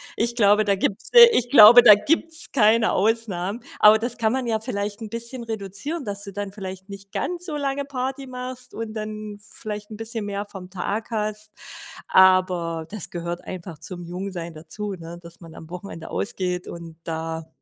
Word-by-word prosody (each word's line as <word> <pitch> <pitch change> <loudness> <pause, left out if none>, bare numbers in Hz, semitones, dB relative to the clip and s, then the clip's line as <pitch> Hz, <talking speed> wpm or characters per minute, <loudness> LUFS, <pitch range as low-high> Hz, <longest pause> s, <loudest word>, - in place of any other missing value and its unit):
Ich 235 +1 -1
glaube, 210 -2 +4
da 200 -1 +2
gibt's, 195 +1 -2
äh 475 -1 +11
ich 245 - +1
glaube, 235 -1 +10
da 215 -3 +10
gibt's 320 +9 -1
keine 225 -2 +4
Ausnahmen. 210 -1 -1 0.2
Aber 210 +1 +8
das 240 +1 -3
kann 220 -2 +1
man 260 0 -1
ja 220 -1 0
vielleicht 210 -2 -4
'n 220 - -6
bisschen 235 +2 -6
reduzieren, 225 - -5
dass 200 0 -4
du 200 - -7
dann 205 0 -4
vielleicht 190 -1 -8
nicht 195 0 -11
ganz 355 0 -3
so 310 -4 -4
lange 280 -1 -2
Party 270 0 -4
machst 250 0 -8
und 225 -1 -5
dann 215 -1 -6
vielleicht 210 -1 -7
'n 215 - -8
bisschen 225 -1 -5
mehr 205 0 -4
vom 190 -3 -10
Tag 200 +4 -4
hast. 215 -1 -3 0.6
Aber 180 -3 +3
das 210 -4 -6
gehört 170 0 -5
einfach 175 -3 -8
zum 175 +2 -8
Jungsein 175 -1 -6
dazu, 175 +7 -6
ne? 170 -1 -9
Dass 170 0 -14
man 165 -1 -12
am 160 - -12
Wochenende 180 -2 -8
ausgeht 180 -5 -3
und 170 -1 -9
da 160 0 -4
205 Hz, 185 wpm, -23 LUFS, 185-230 Hz, 0.6 s, äh